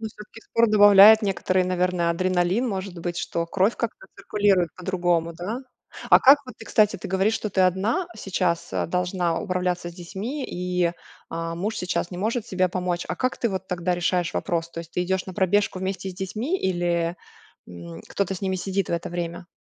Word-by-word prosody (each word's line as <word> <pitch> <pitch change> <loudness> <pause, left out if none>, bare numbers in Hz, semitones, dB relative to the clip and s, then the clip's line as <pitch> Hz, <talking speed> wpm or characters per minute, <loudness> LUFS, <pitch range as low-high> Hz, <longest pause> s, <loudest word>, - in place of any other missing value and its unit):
Ну 220 - -4
всё-таки 210 +1 -13
спорт 230 -1 +2
добавляет 205 +1 +8
некоторый, 185 -2 +1
наверно, 180 -1 0
адреналин, 185 +6 +1
может 190 -3 -4
быть, 175 +1 -4
что 170 -1 -2
кровь 195 +6 +1
как-то 225 -4 -4
циркулирует 195 -3 +1
по-другому, 175 -2 0
да? 185 +8 -4 0.5
А - - +9
как 275 +3 +8
вот 255 - -9
ты, - - -10
кстати, 215 -2 +3
ты - - -7
говоришь, 190 +4 +1
что 215 -1 -3
ты 190 - 0
одна 200 - +1
сейчас, 180 -4 -1
а, - - -1
должна 180 -1 -1
управляться 180 -3 -2
с - - -15
детьми 200 - -5
и, 180 -1 -1 0.4
а, 165 0 -4
муж 205 +6 -3
сейчас 180 -1 -2
не 180 - -6
может 225 +3 -1
тебе 185 -1 +1
помочь, 180 -1 -2
а - - -1
как 255 0 -1
ты 235 - +1
вот 190 -2 -5
тогда 180 0 -1
решаешь 175 -1 0
вопрос? 170 -1 -1
То - - -7
есть, 165 0 -12
ты 180 - -1
идёшь 190 +1 -1
на 185 - -7
пробежку 200 0 +1
вместе 190 0 -3
с - - -11
детьми 220 - -3
или, 175 -2 0 0.5
м, 85 -1 -10
кто-то 195 -1 -1
с 180 - -8
ними 190 -1 0
сидит 195 +1 -2
в - - -2
это 170 - -2
время? 175 0 -5
185 Hz, 195 wpm, -24 LUFS, 175-200 Hz, 0.5 s, А